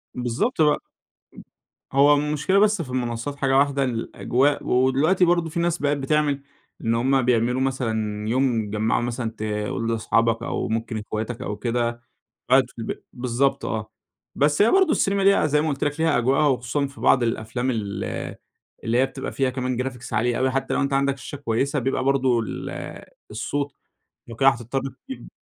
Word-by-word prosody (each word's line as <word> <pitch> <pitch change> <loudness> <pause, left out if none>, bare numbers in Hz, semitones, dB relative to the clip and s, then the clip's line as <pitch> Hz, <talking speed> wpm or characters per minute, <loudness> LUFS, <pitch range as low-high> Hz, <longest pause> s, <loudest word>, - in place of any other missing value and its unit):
بالضبط 125 - -1
بق 150 -1 +4 1.1
هو 140 +2 +6
المشكلة 150 +6 +1
بس 210 -2 +3
في 145 - -7
المنصات 125 +1 -3
حاجة 135 -1 +1
واحدة، 140 0 +2
الأجواء 130 +3 0
و 130 +1 +3
دلوقتي 160 +8 +3
برضه 170 -1 +2
في 165 - -3
ناس 170 0 +1
بقِت 145 -1 0
بتعمل 145 0 +1 0.4
إن 115 0 +1
هم 130 +3 +2
بيعملوا 125 +1 +1
مثلًا 110 -5 -2
يوم 125 -1 +2
يتجمعوا 105 +2 0
مثلًا 120 -1 -3
تقول 110 +1 -3
لأصحابك 115 0 +1
أو - - -2
ممكن 115 +1 -2
اخواتك 110 +2 -4
أو 105 - -3
كده، 120 0 -1 0.5
قاعد 130 -1 +5
في 125 - -23
البيت 115 - -6
بالضبط 130 +3 0
آه، 110 -1 -3 0.4
بس 150 +5 +3
هي 220 - +5
برضه 380 -3 +4
السينما 195 -8 +1
ليها 200 -4 +4
زي 150 0 +2
ما 155 - 0
قلت 140 -2 -1
لك 145 +2 -2
ليها 160 -1 +3
أجوائها، 135 +5 +2
وخصوصًا 135 +1 0
في 140 +1 -13
بعض 130 - +4
الأفلام 115 +2 -1
ال 105 -4 -3 0.8
اللي 115 +1 +1
هي 130 - +4
بتبقى - - -6
فيها 135 -1 0
كمان 125 -1 -2
Graphics 125 -2 -7
عالية 120 +2 +1
أوي 130 0 +2
حتى 135 +1 -1
لو - - +1
أنت 140 0 -1
عندك 140 0 +1
شاشة 145 - -7
كويسة، 140 +2 -1
بيبقى 130 0 -1
برضه 130 -3 +2
ال 110 - -5 0.6
الصوت 140 +6 -3 0.5
لو 115 - -8
كده 135 +3 +5
هتضطر 120 +1 -1 0.3
تجيب 265 - -8
130 Hz, 175 wpm, -23 LUFS, 115-145 Hz, 1.1 s, هو